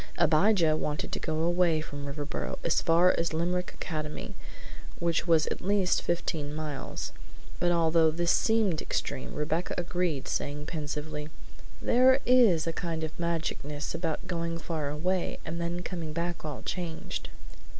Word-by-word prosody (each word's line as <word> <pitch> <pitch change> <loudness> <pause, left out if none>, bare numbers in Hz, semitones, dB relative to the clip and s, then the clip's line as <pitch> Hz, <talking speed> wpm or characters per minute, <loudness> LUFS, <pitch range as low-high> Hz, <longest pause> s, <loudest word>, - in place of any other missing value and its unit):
Abijah 170 0 +4
wanted 150 -1 -2
to - - -2
go 160 - -2
far 160 - 0
away 175 -1 +3
from 145 -2 -6
Riverboro, 145 +1 -3
as 165 - +2
far 170 +2 +5
as 165 -1 0
Limerick 180 +2 0
Academy, 155 -2 -4 0.6
which 170 +1 0
was 160 -2 +5
at - - -3
least 195 -1 +2
fifteen 155 -4 -2
miles; 150 -3 -4 0.5
but 175 - +3
although 165 -1 +4
this 170 +2 +1
seemed 220 -8 +2
extreme, 130 - -3
Rebecca 155 +4 -1
agreed, 175 -5 -1
saying 145 +1 -2
pensively: 150 -1 -4 0.5
"There 260 +2 +5
IS 235 -10 +5
a 165 - -1
kind 165 -1 -3
of 155 -1 -4
magicness 155 -4 -2
about 165 0 -2
going 170 -2 -2
far 160 -3 -3
away 180 +5 -1
and 170 +1 -3
then 175 +1 -2
coming 165 -5 -4
back 170 +1 -2
all 150 -1 -5
changed." 170 -3 -4
165 Hz, 150 wpm, -29 LUFS, 155-175 Hz, 0.6 s, far